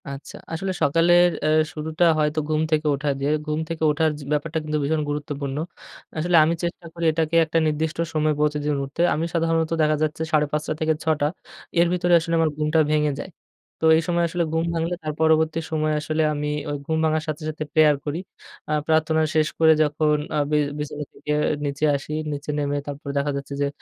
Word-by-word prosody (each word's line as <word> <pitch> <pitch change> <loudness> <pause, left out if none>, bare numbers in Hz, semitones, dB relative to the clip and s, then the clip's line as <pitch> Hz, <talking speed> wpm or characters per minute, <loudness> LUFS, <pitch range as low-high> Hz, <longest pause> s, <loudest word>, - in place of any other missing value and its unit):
আচ্ছা। 140 +1 -8 0.2
আসলে 190 +4 -2
সকালের 175 +4 +5 0.2
এ - - +3 0.3
শুরুটা 160 +2 0
হয়তো 150 +1 +1
ঘুম 155 0 +1
থেকে 155 0 +1
ওঠা 145 +1 -2
দিয়ে। 140 +2 0
ঘুম 155 0 -1
থেকে 165 -1 -4
ওঠার 160 +1 +2
জি - - -9
ব্যাপারটা 150 +2 -1
কিন্তু 155 0 -2
ভীষণ 155 +2 0
গুরুত্বপূর্ণ। 145 -1 -4 0.6
আসলে 175 +3 +1
আমি 160 +2 +2
চেষ্টা 170 0 -4
করি 170 -1 -3
এটাকে 160 +1 -1
একটা 165 +1 -1
নির্দিষ্ট 155 +1 -1 0.2
সময়ে 155 0 +2
প্রতিদিন 150 -1 0
উঠতে। 135 +4 -4
আমি 160 - -1
সাধারণত 165 -1 +1
দেখা 155 0 +3
যাচ্ছে 155 +1 -2
৫ঃ৩০ 150 0 0
থেকে 160 0 +2
৬ঃ০০, 155 -2 +1 0.5
এর 170 - +5
ভিতরে 175 0 +1
আসলে 165 +1 -4
আমার 160 -1 +3
ঘুমটা 155 +1 +1
ভেঙে 150 -1 +2
যায়। - - -6 0.5
তো - - 0
এই - - +2
সময় 175 -1 +1
আসলে 175 +1 0
ঘুম 165 0 +1
ভাঙলে, 165 +1 -1
তার 155 -1 -3
পরবর্তী 160 0 +3
সময়ে 155 -1 0
আসলে 155 +1 -1
আমি 150 0 -3 0.2
ওই 145 - -2
ঘুম 160 +1 -1
ভাঙার 155 0 +1
সাথে, 155 0 -4
সাথে, 155 0 -4
প্রেয়ার 155 -2 +5
করি। 150 +3 -2 0.5
আ - - -2 0.2
প্রার্থনা 160 0 +2
শেষ 155 -1 +3
করে 160 -1 +7
যখন 150 0 +1 0.2
আ - - +1
বি 150 - +3 0.2
বিছানা 150 0 -4
থেকে 150 - -4 0.3
নিচে 145 +2 -1
আসি, 140 +2 -5 0.2
নিচে 145 +1 -6
নেমে 145 -1 -1
তারপরে 140 0 -5
দেখা 140 +1 0
যাচ্ছে 140 0 -7
যে 140 - +2
155 Hz, 195 wpm, -23 LUFS, 150-160 Hz, 0.6 s, করে